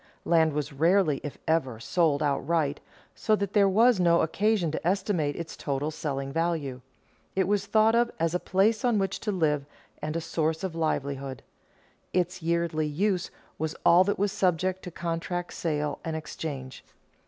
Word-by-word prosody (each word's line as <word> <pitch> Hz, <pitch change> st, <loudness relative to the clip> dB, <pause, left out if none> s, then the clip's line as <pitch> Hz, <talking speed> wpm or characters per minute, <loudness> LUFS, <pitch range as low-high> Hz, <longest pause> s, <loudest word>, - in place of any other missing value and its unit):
Land 160 Hz, -2 st, +3 dB
was 145 Hz, 0 st, -3 dB
rarely, 165 Hz, 0 st, +3 dB
if 145 Hz, -, -6 dB
ever, 135 Hz, -8 st, +1 dB
sold 155 Hz, +2 st, +1 dB
outright, 145 Hz, +1 st, 0 dB, 0.3 s
so 215 Hz, -, +1 dB
that 200 Hz, -2 st, -3 dB
there 200 Hz, -2 st, +5 dB
was 225 Hz, +2 st, +4 dB
no 170 Hz, -1 st, +4 dB
occasion 200 Hz, 0 st, +1 dB
to 160 Hz, -, -3 dB
estimate 185 Hz, -6 st, 0 dB
its 170 Hz, -1 st, -6 dB
total 145 Hz, +2 st, -2 dB
selling 135 Hz, -3 st, -4 dB
value. 160 Hz, -6 st, -1 dB, 0.5 s
It 190 Hz, -1 st, +2 dB
was 200 Hz, 0 st, 0 dB
thought 220 Hz, +1 st, +4 dB
of 235 Hz, 0 st, +3 dB
as 165 Hz, 0 st, +1 dB
a 180 Hz, -, +1 dB
place 205 Hz, +5 st, +2 dB
on 240 Hz, -3 st, +3 dB
which 195 Hz, -1 st, -1 dB
to 210 Hz, -, -2 dB
live 155 Hz, -6 st, +1 dB, 0.4 s
and 155 Hz, +2 st, -2 dB
as 165 Hz, -, -4 dB
a -, -, -9 dB
source 160 Hz, +1 st, -1 dB
of 190 Hz, -3 st, -2 dB
livelihood. 140 Hz, -4 st, -2 dB, 0.7 s
Its 180 Hz, 0 st, 0 dB
yearly 165 Hz, -2 st, 0 dB
use 180 Hz, +4 st, 0 dB, 0.3 s
was 160 Hz, 0 st, -2 dB
all 175 Hz, +2 st, +7 dB
that 200 Hz, -, 0 dB
was 200 Hz, 0 st, +1 dB
subject 185 Hz, -2 st, 0 dB
to -, -, -4 dB
contract, 175 Hz, +1 st, -3 dB
sale, 150 Hz, -3 st, -2 dB
and 160 Hz, -1 st, -3 dB
exchange. 150 Hz, -4 st, -6 dB
165 Hz, 170 wpm, -27 LUFS, 150-190 Hz, 0.7 s, all